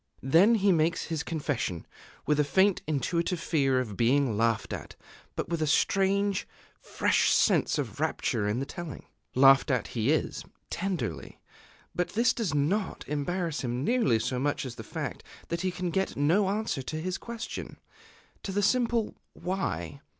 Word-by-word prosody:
Then 170 - +5
he 200 -2 +3
makes 165 0 +2
his 160 -2 -3
confession, 145 - -3 0.4
with 150 0 +2
a - - +5
faint 190 +7 +3
intuitive 170 +4 0
fear 135 -6 +1
of 110 -6 -4
being 125 +1 +2
laughed 115 +1 0
at, - - -7 0.4
but - - -3
with 170 -2 -1
a 155 - +1
strange, 195 +5 +2 0.3
fresh - - +1
sense - - +3
of - - -4
rapture 105 - 0
in 105 +4 0
the 135 - -2
telling. 165 0 -7 0.3
Laughed 135 +2 +6
at 125 -4 0
he 115 +1 -1
is 155 - -1 0.3
tenderly; 170 - -3 0.5
but 180 - -2
this 235 +4 +3
does 225 -7 -2
not 180 +9 -1
embarrass 160 +3 -2
him 125 0 -2
nearly 230 - +3
so 125 +3 -2
much 145 +1 -1
as 130 - -5
the 115 -2 -9
fact - - -5 0.3
that 170 0 -2
he 185 - 0
can 180 -1 -3
get 190 +2 -1
no 175 +8 +3
answer 210 -8 -1
to 155 +4 -5
his 185 +3 -3
question, 235 -1 -6 0.6
to 195 - -5
the 205 +1 0
simple 235 0 +1 0.2
"Why?" 175 - -3
160 Hz, 165 wpm, -28 LUFS, 135-190 Hz, 0.6 s, Laughed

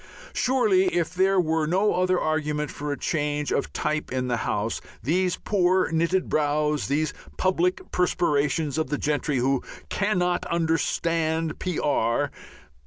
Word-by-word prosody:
Surely 220 -8 +3
if 170 -1 0
there 190 +1 +3
were 160 -2 +1
no 190 +6 +2
other 185 0 +2
argument 150 -1 -1
for 145 0 -4
a 145 - -2
change 150 -2 -1
of - - -1
type 155 0 -2
in 130 -1 -1
the 120 - +1
House, 105 0 -2 0.2
these 180 +7 +1
poor 185 -3 +2
knitted 170 +3 +1
brows, 150 0 +1
these 155 +3 0 0.2
public 180 -1 0
perspirations 150 -4 +1
of 155 - 0
the 150 - 0
gentry 150 -1 0
who 130 +1 +1 0.3
"cannot 180 -3 0
understand 165 -1 0
P.R. 145 -6 0
160 Hz, 135 wpm, -25 LUFS, 145-180 Hz, 0.3 s, Surely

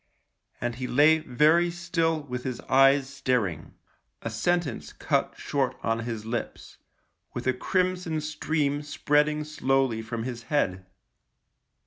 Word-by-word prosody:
And 120 0 -2
he 130 0 -3
lay 150 +5 +5
very 155 +5 +3
still 165 -2 -1
with 125 -3 -5
his 130 -2 -4
eyes 135 +1 +4
staring 125 - -2 0.2
— - - -48
a 115 - -3
sentence 175 +10 -1
cut - - 0
short 135 -3 -1
on 115 0 0
his 115 -2 -5
lips 115 +1 -5 0.3
— - - -47
with - - -4
a 130 - +3
crimson 180 +2 0
stream 155 -1 -1
spreading 150 +1 +1
slowly 135 -5 0
from 115 0 -4
his 120 -1 -5
head. 95 -11 0
135 Hz, 135 wpm, -27 LUFS, 120-155 Hz, 0.3 s, lay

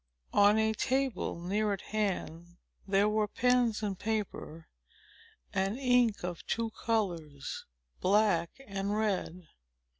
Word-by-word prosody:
On 205 +1 +6
a 220 0 +2
table, 255 -6 -1
near 205 +4 0
at 195 - -4
hand, 175 -5 -3 0.3
there 195 +1 +3
were 210 0 +1
pens 245 -1 +2
and 195 -3 -2
paper, 205 -7 -3 0.9
and 195 +4 0
ink 245 -6 +3
of 175 -2 -4
two 230 -1 -1
colors, 175 -12 -2 0.3
black 190 -4 +3 0.2
and 200 +1 -2
red. 190 -4 -1
205 Hz, 115 wpm, -31 LUFS, 185-220 Hz, 0.9 s, On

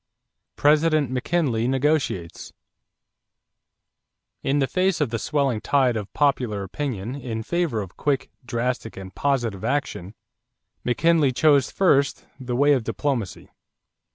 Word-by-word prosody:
=President 150 -2 +3
McKinley 125 -3 0
Negotiates.= 135 - -1 1.9
In 135 +2 0
the 140 - +3
face 185 +4 0
of 145 -7 0
the 115 - -2
swelling 135 -5 0
tide 130 -4 +2
of 105 -2 -5
popular 125 -8 +1
opinion 115 0 -4
in 120 -5 -5
favor 170 -7 -1
of 95 - -13
quick, 145 -3 -1
drastic, 120 -2 -3
and 95 0 -9
positive 120 -9 -1
action, 110 -9 -2 0.7
McKinley 155 +3 +3
chose 140 0 +3
first 140 -8 +2
the 125 -2 -3
way 145 +3 +4
of 130 -4 +1
diplomacy. 125 -6 -3
130 Hz, 120 wpm, -24 LUFS, 115-145 Hz, 1.9 s, way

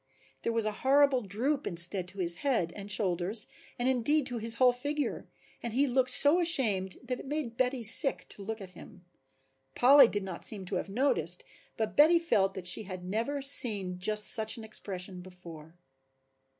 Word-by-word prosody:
There - - -2
was 230 -1 -1
a 215 - -1
horrible 275 -1 +3
droop 245 +8 -3
instead 175 +1 +3
to 190 +2 -11
his 175 -2 -1
head 225 -12 -1
and 205 0 -6
shoulders, 190 +2 -1 0.3
and 245 - -2
indeed 260 +3 +1
to 245 -3 -3
his 225 +1 +4
whole 250 +1 +4
figure, 290 +4 -4 0.3
and 235 -2 -6
he 275 +4 +2
looked 255 -1 0
so 290 +6 +5
ashamed 220 - +2
that 250 0 -5
it - - -11
made 285 -5 -5
Betty 250 0 -2
sick 250 +5 +5
to - - -9
look 220 +3 -6
at 190 -2 -11
him, 180 0 -15 0.7
Polly 270 +1 +6
did 205 -3 -4
not 185 -3 -8
seem 200 -4 +1
to 185 - -5
have 195 - -6
noticed 195 - -1 0.3
but 220 -1 -4
Betty 315 +4 +5
felt 200 - 0
that 185 - -8
she 180 +4 +2
had 185 -3 -9
never 230 +9 -3
seen 205 -9 0
just 210 +3 0
such 220 0 -2
an 225 - -10
expression 190 -4 -6
before. 170 -3 -14
220 Hz, 185 wpm, -29 LUFS, 185-260 Hz, 0.7 s, Polly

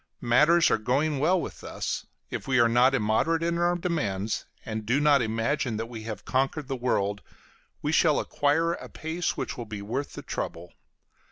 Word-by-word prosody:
Matters 150 +8 +5
are - - +3
going 140 +6 +1
well 175 +6 +3
with - - -7
us; - - -4 0.2
if - - -5
we 130 -1 +3
are 120 - +6
not 125 +3 +4
immoderate 135 +9 +1
in 170 0 0
our 175 +1 +2
demands, 110 - -2 0.2
and 110 -1 -4
do 120 +6 +1
not 145 -2 +5
imagine 115 +2 -1
that 115 - -2
we 115 -1 -8
have 110 -3 -6
conquered 135 +2 0
the 135 - -2
world, 105 -5 0 0.6
we 150 - 0
shall 160 -2 +4
acquire 160 +4 +1
a - - -8
pace 160 +2 -3
which - - -4
will 120 - -4
be 105 -1 -6
worth 130 +7 -3
the - - -8
trouble. 85 +1 -5
130 Hz, 185 wpm, -27 LUFS, 110-155 Hz, 0.6 s, are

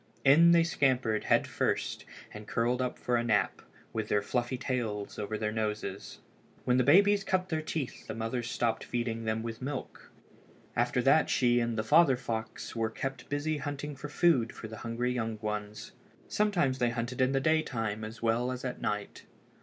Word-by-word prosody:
In 155 +5 +7
they 170 -1 +6
scampered 130 -9 +1
head - - +3
first, - - -2 0.3
and 105 0 -9
curled 120 +2 0
up 125 - -2
for 120 -1 0
a 120 - 0
nap, 110 -4 +1 0.3
with 110 -2 -2
their 105 -1 +2
fluffy 120 +4 -1
tails 115 -6 -3
over 110 +1 -3
their 105 0 -1
noses. 105 -2 -4 0.4
When 125 0 +3
the 130 - +4
babies 200 +8 +5
cut 185 -1 0
their 160 -1 -1
teeth 155 -4 -5
the - - -5
mother 115 +2 -2
stopped 115 -1 -1
feeding 115 -2 -3
them 110 0 -1
with 115 0 -6
milk. 135 +1 -6 0.7
After 120 +1 +1
that 150 +4 +4
she 120 -1 +3
and 115 -1 -1
the 110 - 0
father 135 +3 +5
fox 110 -2 -5
were 115 -1 0
kept 135 +3 -5
busy 145 +2 -1
hunting 145 +1 -5
for 150 +2 -7
food 145 -8 +3
for 110 - -8
the 110 0 -9
hungry 120 +1 -2
young 115 -3 -2
ones. 105 0 -5 0.4
Sometimes 175 -11 +1
they 120 - +2
hunted 120 +2 -3
in 130 +1 +3
the 135 - +3
daytime 120 -9 0
as 110 +1 -8
well 115 +2 +1
as 130 0 -5
at 125 - -4
night. 105 -1 -4
120 Hz, 185 wpm, -30 LUFS, 110-135 Hz, 0.7 s, In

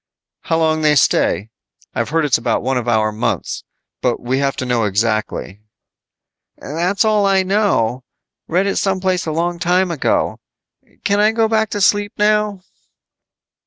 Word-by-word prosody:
"How 165 - -1
long 160 -1 +1
they 150 -1 +3
stay? 110 -5 +2 0.4
I've - - -2
heard 160 +1 +1
it's 135 -5 +2
about 115 - -1
one 130 +2 0
of 125 -1 -2
our 110 -2 +2
months, 105 - -3 0.4
but 125 -2 0
we 130 +2 -1
have 140 -1 0
to 130 - -4
know 120 -3 +1
exactly." 105 -1 -2 1.0
"That's 175 - -1
all 210 -2 +3
I 195 -1 +3
know. 185 - +1 0.4
Read 180 +4 +1
it 200 - -1
some 190 -1 0
place 185 -2 -1
a - - -1
long 170 +2 -1
time 180 +2 +1
ago. 160 - 0 0.6
Can 200 0 +1
I 210 +1 +4
go 225 0 +1
back 220 -1 +1
to 205 - -3
sleep 205 +2 +2
now?" 210 -2 +1
165 Hz, 160 wpm, -18 LUFS, 125-200 Hz, 1.0 s, I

